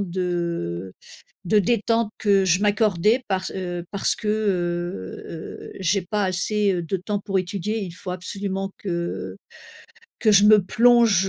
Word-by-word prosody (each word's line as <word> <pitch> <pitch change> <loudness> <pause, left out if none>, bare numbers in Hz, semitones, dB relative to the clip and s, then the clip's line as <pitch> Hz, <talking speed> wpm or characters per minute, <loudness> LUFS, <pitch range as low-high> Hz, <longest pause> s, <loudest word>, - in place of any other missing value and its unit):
de 170 - -3 0.5
de 210 +4 +3
détente 230 +2 +1
que 200 -2 +3
je 180 +1 +3
m'accordais. 210 +2 +2
Parce, 185 -1 -1
heu, 175 -2 -4
parce 200 - 0
que, 215 - -5
heu, 175 - -2
heu, 160 -1 -8
j'ai 190 +2 +2
pas 205 +3 -1
assez, 200 +2 +1
heu, 175 -2 -1
de 170 +4 -2
temps 205 +3 -3
pour 195 -1 -1
étudier. 200 +4 -2
Il 185 - -5
faut 180 +1 -7
absolument 195 +1 -3
que 170 -3 -4 0.8
que 215 -3 +3
je 200 0 +6
me 210 0 +7
plonge, 230 -3 +4
195 Hz, 150 wpm, -23 LUFS, 175-210 Hz, 0.8 s, me